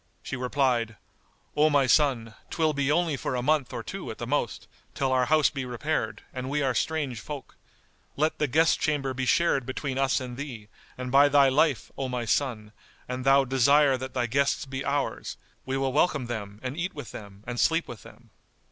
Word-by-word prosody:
She - - -4
replied, 125 -3 0 0.6
"O 150 +1 +4
my 145 -2 +3
son, 130 -6 +2 0.2
'twill 160 -2 +1
be 140 0 0
only 165 -1 +2
for 130 - -3
a 125 - -2
month 150 -2 +1
or - - -5
two - - -6
at - - -6
the - - -5
most, - - -2 0.3
till 135 -1 0
our 130 -1 +3
house 155 +2 +3
be 135 -2 -4
repaired, 125 -2 -3
and 130 0 -4
we 145 +1 0
are 130 -2 +1
strange 140 -2 -1
folk. 145 +1 -8 0.6
Let 155 +2 0
the 150 - +2
guest 160 +5 +3
chamber 140 -3 0
be 130 0 -3
shared 170 -5 +3
between 130 +1 -3
us 135 -1 +2
and 125 -1 -7
thee, 120 -7 -7 0.3
and 125 0 -5
by 140 +2 +6
thy 140 -1 +5
life, 140 0 +1
O 135 -1 -2
my 125 -2 -2
son, 110 -3 -1 0.4
an 125 +1 -4
thou 135 +1 +4
desire 135 +2 +4
that 130 +1 -6
thy 125 -1 +1
guests 140 +4 +1
be 135 0 -5
ours, 140 -1 -2 0.3
we 135 0 -1
will 135 -1 -1
welcome 150 -3 +2
them 105 -3 -6
and 130 +1 -4
eat 175 +2 -3
with 145 -7 -7
them 100 -1 -11
and 120 0 -4
sleep 165 +1 +2
with 120 - -9
them." - - -16
135 Hz, 200 wpm, -27 LUFS, 125-145 Hz, 0.6 s, by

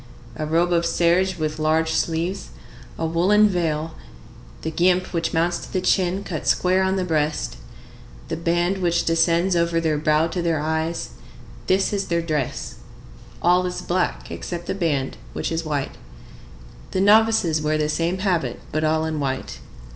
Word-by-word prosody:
A 155 -1 -3
robe 170 +3 +2
of 170 0 +2
serge 175 +2 +2
with 155 -1 -3
large 160 +1 +1
sleeves, 165 +4 -1 0.5
a - - -4
large 160 0 -2
woollen 205 +5 +5
veil, 165 -4 -1 0.7
the 160 - -2
guimpe 180 +3 +1
which 165 -1 -1
mounts 170 +1 +1
to - - -10
the 185 - 0
chin 185 +1 +1
cut 160 -7 -5
square 185 +1 +3
on 190 0 +1
the 190 - 0
breast, 150 - -1 0.7
the - - -3
band 175 +3 0
which 170 -2 +1
descends 170 +2 +2
over 170 0 +2
their 155 -2 0
brow 155 +1 +3
to 170 +2 -3
their 165 -2 0
eyes,—this 160 - -3
is 200 -1 -1
their 170 -1 0
dress. 150 -5 -3 0.7
All 180 +1 +4
is 180 - -5
black 180 0 -1
except 175 -1 -5
the - - -2
band, 155 -8 -1 0.2
which - - -3
is 165 0 -2
white. 145 -3 -2 1.0
The 185 - -2
novices 205 -6 +4
wear 155 0 +1
the 150 0 0
same 165 +4 0
habit, 175 - -1
but 155 +1 -1
all 155 0 +1
in 160 -1 -2
white. 135 -2 -3
170 Hz, 165 wpm, -22 LUFS, 155-180 Hz, 1.0 s, woollen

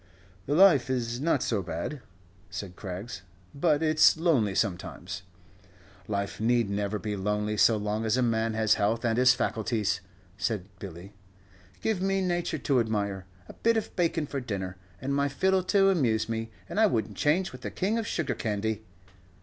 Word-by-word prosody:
"The 145 - +1
life 170 -8 +6
is 120 -1 -1
not 150 -4 +2
so 110 -4 0
bad," 90 - -4 0.5
said 95 -2 -6
Craggs, 100 +4 -6 0.3
"but 150 +1 +2
it's 155 0 +5
lonely 135 - +2
sometimes." 95 -2 -2 0.9
"Life 100 -1 -3
need 115 -2 +2
never 100 +1 -1
be 105 0 -3
lonely 105 +2 -1
so 110 +1 +5
long 105 +1 -2
as 110 +2 +1
a 130 - +2
man 115 -1 +1
has 110 -1 +3
health 110 +4 0
and 115 -1 +2
his 125 0 +6
faculties," 110 -4 -1 0.4
said 100 -1 -1
Billy; 95 +1 -9 0.7
"give 220 -4 0
me 195 0 +1
nature 175 -3 -1
to 135 -3 +1
admire, 100 -4 -1 0.2
a - - -10
bit 230 0 +2
of 220 - -3
baycon 165 -3 +1
for 140 - -3
dinner, 95 -7 -4 0.2
and 135 +5 -2
my 140 0 +1
fiddle 190 +7 +2
to 195 +1 +4
amuse 120 - +1
me, 115 0 -3 0.2
and - - -3
I 220 - +6
would 110 - -1
n't - - -12
change 170 +6 +2
with - - -11
the - - -4
King 210 +5 0
of 220 - -3
Sugar 170 - -1
'Candy.'" 110 0 -2
115 Hz, 175 wpm, -28 LUFS, 105-155 Hz, 0.9 s, life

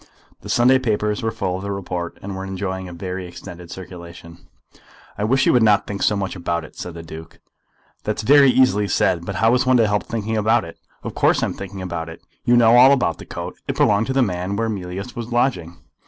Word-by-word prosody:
The - - -10
Sunday 125 +2 +4
papers 105 -3 -1
were 115 - 0
full 95 -4 -3
of - - -7
the 100 +1 -4
report, 90 -3 -4
and 100 0 -5
were 95 - -5
enjoying 95 -1 -4
a - - -9
very 90 +1 -5
extended 90 -1 -11
circulation. 85 -2 -11 0.7
"I 105 - -4
wish 135 +5 +2
you - - +4
would 125 - +4
not 105 -2 +4
think 100 -1 -5
so 105 - +2
much 100 -1 -3
about 85 -1 -2
it," - - -16
said 90 -2 -7
the 85 - -8
Duke. 80 0 -11 0.6
"That's 105 0 -2
very 140 +3 +6
easily 125 -6 +3
said, 90 -2 +1
but 100 - -4
how 115 +4 +3
is 125 +1 +1
one 130 -1 +5
to 115 - +4
help 105 0 -1
thinking 110 -1 -2
about 110 -1 +2
it? 85 - -12 0.2
Of - - -5
course - - +2
I - - +3
am - - -3
thinking 95 -1 -7
about 85 -2 -4
it. 80 - -12 0.2
You 120 0 +4
know 120 0 +6
all 130 +3 +8
about 125 - 0
the - - -11
coat. - - -6
It - - -3
belonged 105 +2 +3
to 135 - -1
the 135 -1 +3
man 90 -1 -2
where 115 +2 -1
Mealyus 100 +2 -5
was 120 0 -6
lodging." 105 -9 0
100 Hz, 235 wpm, -21 LUFS, 90-115 Hz, 0.7 s, all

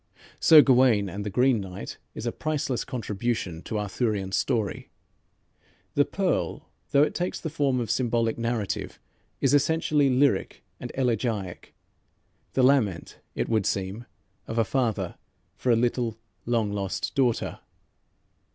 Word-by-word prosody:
"Sir 155 -2 +8
Gawayne 125 -6 +4
and 100 +3 -5
the 105 - -3
Green 125 +1 +3
Knight" 95 -1 -7 0.2
is - - -6
a 120 - 0
priceless 150 -4 -2
contribution 115 -6 -3
to 110 - -4
Arthurian 105 -1 -1
story. 110 0 -1 1.0
"The - - +3
Pearl," - - -2 0.2
though 140 - +5
it - - 0
takes 180 +1 -2
the 160 - -5
form 140 -5 +1
of 115 -3 -2
symbolic 115 -2 +1
narrative, 115 -3 -3 0.4
is 135 - +3
essentially 145 -1 +3
lyric 130 -5 +1 0.2
and - - -6
elegiac, 115 -7 -2 0.8
the 130 - +2
lament, 125 -10 +2 0.2
it - - -1
would 110 -4 +1
seem, 100 +5 -3 0.4
of 115 - -4
a 115 - +4
father 120 -2 -1 0.4
for 125 - 0
a - - +5
little, 120 -1 0 0.3
long 115 -4 +1
lost 100 -2 -3
daughter. 125 -4 0
120 Hz, 135 wpm, -26 LUFS, 105-130 Hz, 1.0 s, Sir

